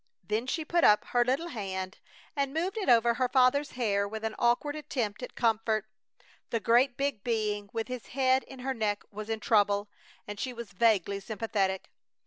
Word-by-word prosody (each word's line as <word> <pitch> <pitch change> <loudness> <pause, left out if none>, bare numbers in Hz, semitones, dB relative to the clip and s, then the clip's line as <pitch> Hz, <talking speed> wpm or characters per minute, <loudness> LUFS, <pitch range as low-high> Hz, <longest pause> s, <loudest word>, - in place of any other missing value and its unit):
Then 215 +7 -2
she 310 +4 -2
put 340 +1 +1
up 210 - +5
her 245 0 +3
little 270 +8 0
hand 190 - -5 0.4
and 280 -2 0
moved 360 +5 -1
it 425 -8 -1
over 235 -1 +5
her 250 +1 0
father's 265 +3 +3
hair 200 -5 0
with 220 +1 -6
an 220 -1 -2
awkward 240 +5 +2
attempt 255 -9 -3
at 250 - -7
comfort. 220 -2 +1 0.6
The 230 - 0
great 245 +4 +3
big 275 -7 -1
being 210 -3 -1
with 225 -1 -3
his 250 -2 -6
head 260 0 +2
in 265 -2 -11
her 265 +1 -1
neck 210 -4 -1
was 215 +1 -7
in 225 -1 -1
trouble, 205 -2 +2 0.4
and 205 -1 -6
she 255 +3 -3
was 235 -5 -8
vaguely 200 -2 +2
sympathetic. 200 -3 -2
230 Hz, 185 wpm, -29 LUFS, 210-260 Hz, 0.6 s, up